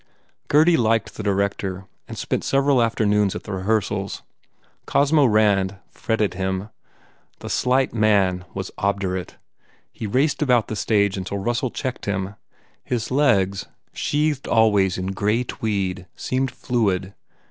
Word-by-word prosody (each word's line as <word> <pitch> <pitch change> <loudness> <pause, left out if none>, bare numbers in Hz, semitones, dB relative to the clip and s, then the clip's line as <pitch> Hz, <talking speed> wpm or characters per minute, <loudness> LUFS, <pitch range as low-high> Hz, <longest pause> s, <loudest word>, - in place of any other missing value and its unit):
Gurdy 160 +3 +5
liked 115 -1 +1
the - - -6
director 100 -2 -1 0.2
and - - -8
spent - - -2
several 135 -2 +3
afternoons 105 -3 +2
at - - -6
the 105 - -8
rehearsals. 100 0 -1 0.6
Cosmo 145 +1 +3
Rand 100 -4 +3 0.2
fret 115 - -2
ted 105 -2 0
him. 95 +2 -3 0.7
The - - -6
slight 130 +1 +1
man 100 -5 +2
was 95 -1 -4
obdurate. 95 -2 -2 0.5
He 110 - -6
raced 140 +7 +1
about 125 -6 +2
the 110 - -3
stage 100 -2 +1
until 95 +1 -4
Russell 120 +5 -1
checked 130 -1 -5
him. 95 -1 -2 0.5
His 120 -1 -3
legs, 100 -9 +2 0.3
sheathed 150 -1 -1
always 105 -5 +3
in 95 +1 -3
grey 105 +5 0
tweed, 100 -6 -3
seemed 130 +1 -1
fluid. 100 -8 -1
105 Hz, 135 wpm, -22 LUFS, 95-125 Hz, 0.7 s, Gurdy